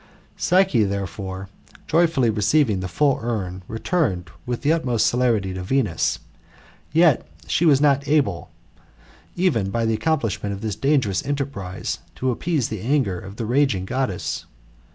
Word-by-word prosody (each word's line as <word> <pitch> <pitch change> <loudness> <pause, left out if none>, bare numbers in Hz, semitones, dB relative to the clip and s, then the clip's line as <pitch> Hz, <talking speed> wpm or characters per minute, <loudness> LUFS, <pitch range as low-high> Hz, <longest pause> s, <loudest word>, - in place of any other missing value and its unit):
Psyche, 180 - +3
therefore, 95 -1 -4 0.4
joyfully 160 -7 +3
receiving 110 +1 +2
the 95 - -3
full 140 +7 +2
urn, 95 -6 -3
returned 110 - -1 0.2
with 120 -1 -3
th^ 150 +3 +4
utmost 125 -9 +1
celerity 115 -6 +1
to 95 - -5
Venus. 105 -2 0 0.7
Yet 160 - +4 0.2
she 155 - +1
was 145 -4 +6
not 140 -1 +3
able, 140 - +1 0.9
even 150 - +1
by 115 +3 0
the 115 - +1
accomplishment 115 -7 -1
of 100 - -7
this 110 -2 -2
dangerous 135 - +1
enterprise, 135 -10 -3 0.2
to 130 0 0
appease 150 0 -1
the 110 -4 -5
anger 120 -8 +1
of 95 +2 -10
the 115 - -4
raging 125 -6 +1
Goddess. 125 -4 -2
120 Hz, 140 wpm, -22 LUFS, 100-145 Hz, 0.9 s, was